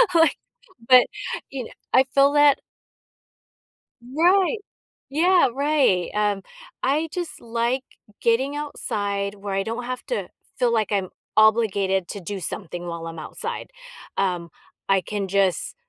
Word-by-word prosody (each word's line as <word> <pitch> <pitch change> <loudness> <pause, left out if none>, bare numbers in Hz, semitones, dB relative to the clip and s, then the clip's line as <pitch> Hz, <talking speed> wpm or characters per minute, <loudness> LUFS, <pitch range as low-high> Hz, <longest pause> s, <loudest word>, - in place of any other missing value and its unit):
Like 325 -1 +5 0.5
but, 255 -1 +9 0.4
you 265 -3 -5
kn - - -12 0.2
I 260 - +7
feel 280 +1 +5
that 290 -1 +5 1.4
Right 355 - +3 0.6
yeah, 350 -1 +5
right, 275 - +2
um, 205 -2 +1 0.4
I 290 +5 +1
just 350 -3 -4
like 235 +3 -1 0.4
getting 260 +5 +2
outside 205 -8 -2
where 200 -1 -5
I 195 - +1
don't 230 +4 -4
have 255 0 -4
to - - -2 0.3
feel 245 -2 +2
like 220 -3 +1
I'm 195 -3 0 0.3
obligated 200 -4 +3
to 200 - -5
do 195 +2 -5
something 175 0 -5
while 170 -1 -5
I'm 165 0 -7
outside, 155 - -5 0.5
um, 180 -3 0 0.4
I 195 -1 +3
can 205 -1 -3
just 195 -1 +1
225 Hz, 130 wpm, -23 LUFS, 195-275 Hz, 1.4 s, but